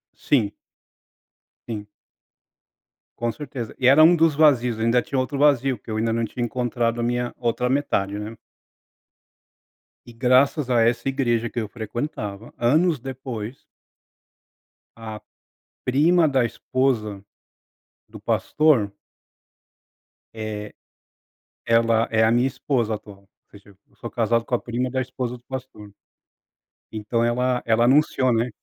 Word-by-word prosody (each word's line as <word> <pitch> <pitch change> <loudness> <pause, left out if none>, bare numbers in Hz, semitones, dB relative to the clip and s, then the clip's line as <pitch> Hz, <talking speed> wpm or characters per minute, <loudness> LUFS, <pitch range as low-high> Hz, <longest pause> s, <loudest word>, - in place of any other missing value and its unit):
Sim. 110 -8 +1 1.2
Sim. 105 -3 -5 1.3
Com 120 0 -1
certeza. 130 -6 -7
E 125 - +3
era 145 +4 +7
um 175 +2 +7
dos 165 -3 +3
vazios, 125 -7 +3
eu 110 - -1
ainda 120 +1 +3
tinha 135 - -4
outro 135 +2 -2
vazio, 135 -3 +3
porque 105 - -16
eu 110 - -2
ainda 115 0 0
não 115 0 0
tinha 120 +3 -4
encontrado 120 -1 -1
a - - 0
minha 120 0 -1
outra 125 +1 -1
metade, 105 -8 0
né. 110 +2 -6 1.7
E 120 - -13
graças 130 +3 +2
a 120 -2 +3
essa 120 +2 +1
igreja 120 -4 0
que 120 - -4
eu 110 - -3
frequentava, 110 -2 -5
anos 155 +5 +2
depois 125 -2 -7 1.3
a 110 -2 -8 0.6
prima 160 +6 +4
da 135 -3 +2
esposa 115 -5 -1 0.9
do - - -12
pastor 135 -10 +2 1.4
eh, 110 -1 -6 0.9
ela 115 0 +3
é 110 0 +3
a 110 - +4
minha 120 +2 +3
esposa 120 -5 -1
atual, 100 -2 -12
ou 100 - -29 0.2
seja, 100 0 -16 0.2
eu - - -29
sou 120 - -7
casado 115 0 +1
com - - -8
a - - -1
prima 125 +2 -3
da 130 - -1
esposa 125 -1 -4
do 120 - -25
pastor. 130 -6 -8 1.0
Então 110 +2 -1
ela 125 +1 +1
ela 115 +1 +3
anunciou, 130 -1 +3
né, 115 +2 +1
120 Hz, 135 wpm, -23 LUFS, 115-130 Hz, 1.7 s, era